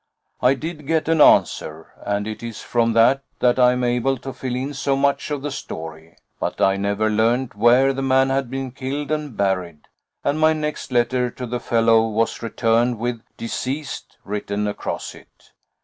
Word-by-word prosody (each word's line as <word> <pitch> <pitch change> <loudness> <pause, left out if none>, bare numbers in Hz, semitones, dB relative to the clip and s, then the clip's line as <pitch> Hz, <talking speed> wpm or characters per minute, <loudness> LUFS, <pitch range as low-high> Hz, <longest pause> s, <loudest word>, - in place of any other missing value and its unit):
I 125 +2 +4
did 155 0 -7
get 160 0 +1
an 165 -2 +3
answer, 80 - +3
and 100 0 -1
it 110 0 -6
is 115 -2 -6
from 115 -1 0
that 120 +4 +4 0.2
that 125 +1 +2
I 125 0 +6
am 125 0 -2
able 125 +2 +1
to 135 +2 -7
fill 130 0 -4
in 135 +3 -3
so 135 0 0
much 140 +1 +1
of 145 -2 -3
the 145 - -3
story. 80 -9 -8 0.2
But - - -3
I 95 0 +3
never 100 +2 0
learned 115 +4 +1
where 120 +6 +4
the 135 - -3
man 135 0 +3
had 135 -2 0
been 135 0 -4
killed 140 +3 -4
and 150 -6 -3
buried, 90 -6 -1 0.4
and 145 +2 0
my 155 0 +5
next 150 -3 -4
letter 125 +1 +1
to 125 +1 -7
the 120 +1 -3
fellow 115 -1 +3
was 115 +1 -1
returned 115 +1 +1
with 120 0 -3 0.2
'Deceased' 130 +4 -5
written 105 0 -2
across 105 - -4
it. - - -19
125 Hz, 180 wpm, -21 LUFS, 110-135 Hz, 0.4 s, I